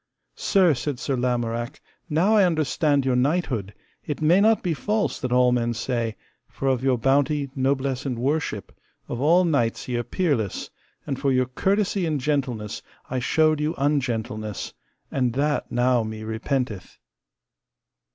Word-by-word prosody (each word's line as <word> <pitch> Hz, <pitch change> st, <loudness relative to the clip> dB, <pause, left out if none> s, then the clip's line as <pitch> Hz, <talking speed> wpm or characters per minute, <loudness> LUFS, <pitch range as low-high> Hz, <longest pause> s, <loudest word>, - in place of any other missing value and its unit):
Sir, 185 Hz, -5 st, +3 dB
said 135 Hz, +1 st, -3 dB
Sir 135 Hz, +2 st, -2 dB
Lamorak, 120 Hz, +1 st, -2 dB, 0.3 s
now 175 Hz, +8 st, +3 dB
I 205 Hz, -, +6 dB
understand 150 Hz, -4 st, +1 dB
your 130 Hz, -2 st, +2 dB
knighthood, 125 Hz, -, 0 dB, 0.3 s
it 150 Hz, -, -4 dB
may 170 Hz, +5 st, +4 dB
not 220 Hz, +1 st, +4 dB
be 175 Hz, -3 st, 0 dB
false 210 Hz, +7 st, -1 dB
that 130 Hz, -4 st, -2 dB
all 125 Hz, 0 st, +4 dB
men 120 Hz, -1 st, 0 dB
say, 115 Hz, -1 st, -2 dB, 0.3 s
for 135 Hz, -, -4 dB
of 130 Hz, -1 st, 0 dB
your 130 Hz, -2 st, +2 dB
bounty, 140 Hz, +3 st, +1 dB
noblesse, 135 Hz, -1 st, 0 dB
and 130 Hz, -4 st, -3 dB
worship, 130 Hz, -, -2 dB, 0.3 s
of 120 Hz, -, -4 dB
all 170 Hz, +5 st, +5 dB
knights 130 Hz, -9 st, 0 dB
ye 125 Hz, -1 st, -1 dB
are 120 Hz, -, -1 dB
peerless, 135 Hz, -, -1 dB, 0.3 s
and 135 Hz, -3 st, -3 dB
for 140 Hz, 0 st, +1 dB
your 130 Hz, 0 st, +3 dB
courtesy 195 Hz, +7 st, 0 dB
and 155 Hz, -2 st, 0 dB
gentleness 125 Hz, -7 st, -2 dB, 0.3 s
I 130 Hz, -, 0 dB
showed 155 Hz, +4 st, +2 dB
you 155 Hz, +2 st, -1 dB
ungentleness, 120 Hz, -7 st, -2 dB, 0.4 s
and 125 Hz, -3 st, 0 dB
that 145 Hz, +3 st, 0 dB
now 125 Hz, 0 st, +2 dB
me 110 Hz, 0 st, -5 dB
repenteth. 110 Hz, -2 st, -3 dB
135 Hz, 150 wpm, -24 LUFS, 120-150 Hz, 0.4 s, I